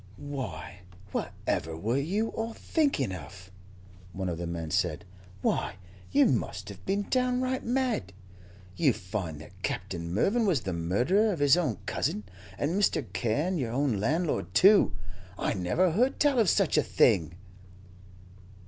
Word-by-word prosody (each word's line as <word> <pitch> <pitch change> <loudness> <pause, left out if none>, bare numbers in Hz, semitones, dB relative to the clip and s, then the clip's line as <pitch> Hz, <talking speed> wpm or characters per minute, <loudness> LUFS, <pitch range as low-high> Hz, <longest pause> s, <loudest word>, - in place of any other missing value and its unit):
"Why, 100 - -6 0.3
whatever 80 -3 -2
were 115 +10 0
you 200 +10 0
all 225 +1 -4
thinking 275 - 0
of?" 95 +2 -9 0.6
one 95 -1 -3
of 85 -1 -4
the 85 - -3
men 85 -2 -4
said. - - 0 0.4
"Why, - - 0 0.4
you 145 - +5
must 100 -5 -1
have 100 -1 -10
been 200 +1 0
downright 255 0 +1
mad. 245 - 0 0.6
You 145 -7 +3
find 95 -6 -5
that - - -15
Captain 85 -3 -3
Mervyn 210 - +2
was 165 -10 +2
the 95 - -3
murderer 120 - +2
of 180 - -2
his 145 0 +5
own 155 - 0
cousin, 105 - -1 0.3
and 145 - 0
Mr. 195 -7 +1
Carne 145 - 0
your 120 -4 -2
own 130 -5 +1
landlord, 155 - -1
too! 200 - +6 0.4
I - - 0
never 110 - +1
heard 245 +10 +1
tell 285 -4 +3
of 215 -6 +4
such - - +3
a - - +5
thing." 85 +1 +3
130 Hz, 150 wpm, -29 LUFS, -, 0.6 s, too